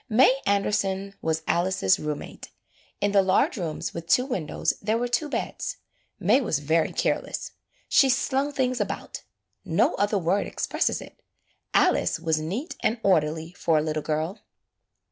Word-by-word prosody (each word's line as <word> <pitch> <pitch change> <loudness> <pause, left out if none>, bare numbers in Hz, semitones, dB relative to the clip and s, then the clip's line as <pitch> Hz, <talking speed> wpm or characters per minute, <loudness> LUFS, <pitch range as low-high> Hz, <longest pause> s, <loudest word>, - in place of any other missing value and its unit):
May 255 +4 +5
Anderson 200 -1 0
was 160 0 -1
Alice's 175 - +2
room 150 -1 -2
mate. - - -10 0.5
In 205 0 +2
the 200 -1 +5
large 190 0 +2
rooms 165 -4 -4
with 170 0 -7
two 250 - +4
windows 190 - -1
there 215 +2 +1
were 245 +1 -1
two 295 +5 0
beds. - - -3 0.4
May 275 - +4
was 200 - 0
very 160 +3 +1
careless. - - -2 0.4
She 270 - +5
slung 270 +2 +1
things 255 -4 0
about; 205 - -4 0.4
no - - +2
other 205 +1 +1
word 190 +3 +1
expresses - - -1
it. - - -13 0.5
Alice - - +3
was 160 -1 0
neat 200 - -4
and 230 +2 0
orderly 160 -3 +1
for 165 -2 +1
a 150 - +2
little 155 0 -2
girl. 160 +6 -2
195 Hz, 155 wpm, -26 LUFS, 160-235 Hz, 0.5 s, May